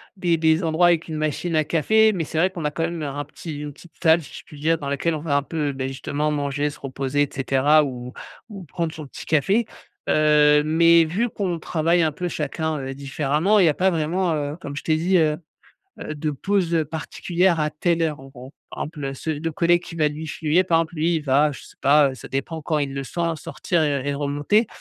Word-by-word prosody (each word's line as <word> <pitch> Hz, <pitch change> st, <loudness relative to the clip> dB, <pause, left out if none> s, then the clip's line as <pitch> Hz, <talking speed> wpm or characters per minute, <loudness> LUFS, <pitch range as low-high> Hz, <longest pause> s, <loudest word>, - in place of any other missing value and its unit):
des 175 Hz, -3 st, +1 dB
des 160 Hz, +2 st, +2 dB
endroits 165 Hz, +2 st, +3 dB
avec 170 Hz, -1 st, +2 dB
une 155 Hz, -, -4 dB
machine 155 Hz, +2 st, -2 dB
à 155 Hz, -, +3 dB
café 220 Hz, +8 st, +3 dB
mais 170 Hz, -3 st, -2 dB
c'est 155 Hz, -, -6 dB
vrai 180 Hz, +3 st, +3 dB
qu'on 175 Hz, -4 st, -7 dB
a 150 Hz, -, 0 dB
quand 165 Hz, -, -3 dB
même 165 Hz, -2 st, -3 dB
un 145 Hz, 0 st, -3 dB
petit 150 Hz, 0 st, -8 dB
une 150 Hz, -1 st, -6 dB
petite 175 Hz, -, -17 dB
salle, 165 Hz, 0 st, +5 dB
si -, -, -13 dB
je -, -, -14 dB
puis 150 Hz, -, -13 dB
dire, 165 Hz, +2 st, +2 dB
dans 145 Hz, -3 st, -6 dB
laquelle 155 Hz, +3 st, 0 dB
on -, -, -4 dB
va 150 Hz, -3 st, -1 dB
un 140 Hz, -, 0 dB
peu, 145 Hz, -1 st, -2 dB
beh, 135 Hz, 0 st, -3 dB
justement 145 Hz, +3 st, -2 dB
manger, 145 Hz, 0 st, -1 dB
se 145 Hz, -, -12 dB
reposer 135 Hz, +1 st, -1 dB
et 145 Hz, -, -3 dB
cetera 140 Hz, +3 st, +3 dB
ou 125 Hz, -2 st, -6 dB, 0.4 s
ou 195 Hz, -3 st, -9 dB
prendre 165 Hz, 0 st, -4 dB
son 155 Hz, -2 st, -8 dB
petit -, -, -10 dB
café. 195 Hz, -, +2 dB, 0.4 s
Heu, 150 Hz, -1 st, +5 dB
mais 165 Hz, +2 st, +5 dB
vu 200 Hz, +10 st, -1 dB
qu'on 180 Hz, -6 st, -3 dB
travaille 165 Hz, +2 st, +1 dB
un 155 Hz, -2 st, +1 dB
peu 180 Hz, +3 st, -3 dB
chacun, 155 Hz, 0 st, -3 dB
heu, 135 Hz, 0 st, -5 dB
différemment, 150 Hz, +8 st, +1 dB
il 180 Hz, -, +5 dB
y -, -, +5 dB
a -, -, +2 dB
pas 190 Hz, +4 st, +2 dB
vraiment, 170 Hz, +1 st, 0 dB
heu, 145 Hz, 0 st, -2 dB
comme 140 Hz, 0 st, -6 dB
je -, -, -5 dB
t'ai 155 Hz, -, +2 dB
dit, 180 Hz, +4 st, +2 dB
heu 155 Hz, -2 st, +2 dB, 0.6 s
heu, 155 Hz, -, -5 dB
de 150 Hz, +1 st, -2 dB
pause, 180 Hz, +3 st, -1 dB
heu, 160 Hz, -2 st, +2 dB
particulière 170 Hz, +3 st, -1 dB
à 150 Hz, 0 st, 0 dB
telle 165 Hz, +2 st, 0 dB
heure 155 Hz, -4 st, -1 dB
en 135 Hz, -, -12 dB
gros. 130 Hz, +1 st, -12 dB, 0.2 s
Par -, -, -4 dB
exemple, 140 Hz, -3 st, -6 dB
ce 160 Hz, -, -4 dB
le 155 Hz, +2 st, -2 dB
collègue 175 Hz, +2 st, +2 dB
qui 165 Hz, -, -9 dB
va 155 Hz, -2 st, +2 dB
lui 150 Hz, +2 st, -4 dB
fuyez, 160 Hz, +4 st, +1 dB
par 170 Hz, -3 st, +2 dB
exemple, 165 Hz, +1 st, -2 dB
lui 165 Hz, +2 st, +1 dB
il -, -, -1 dB
va 145 Hz, +2 st, +3 dB
je 140 Hz, -, -9 dB
sais -, -, -16 dB
pas 140 Hz, -1 st, +4 dB
ça -, -, -11 dB
dépend 140 Hz, +4 st, -4 dB
quand 155 Hz, -1 st, 0 dB
il 140 Hz, -1 st, -2 dB
le 135 Hz, -, -3 dB
sent 165 Hz, +4 st, -2 dB
sortir 155 Hz, +3 st, -2 dB
et 140 Hz, -2 st, 0 dB
et 140 Hz, -, -1 dB
remonter, 145 Hz, +10 st, +1 dB
155 Hz, 245 wpm, -23 LUFS, 145-170 Hz, 0.6 s, salle